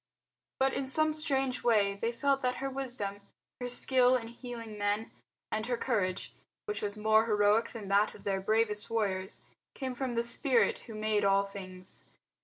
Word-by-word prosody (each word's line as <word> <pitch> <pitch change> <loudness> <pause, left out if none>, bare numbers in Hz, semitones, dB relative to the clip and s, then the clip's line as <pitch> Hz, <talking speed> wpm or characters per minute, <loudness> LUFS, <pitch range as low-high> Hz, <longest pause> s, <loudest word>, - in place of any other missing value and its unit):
But 265 0 +3
in 270 - -2
some 310 +3 +3
strange 270 -4 -1
way 210 -4 +3
they 230 +4 -2
felt 275 +3 +1
that 250 0 0
her 270 0 -3
wisdom, 245 -7 -4 0.4
her 245 0 -3
skill 250 0 +4
in 230 -2 -2
healing 235 -2 -8
men, 205 +2 -1 0.4
and 220 +1 -2
her 245 -1 0
courage, 200 -8 -1 0.3
which 420 -1 -3
was 205 +1 -3
more 220 +1 +4
heroic 210 +1 +3
than 220 -4 -8
that 200 +2 +3
of - - -14
their 195 -1 -1
bravest 210 +1 +1
warriors, 195 -4 -1 0.3
came 260 -2 -3
from 250 -1 -3
the 235 - +1
Spirit 245 +1 +2
who 225 - -8
made 215 -1 0
all 195 0 +4
things. 185 -2 -10
225 Hz, 175 wpm, -31 LUFS, 205-255 Hz, 0.4 s, skill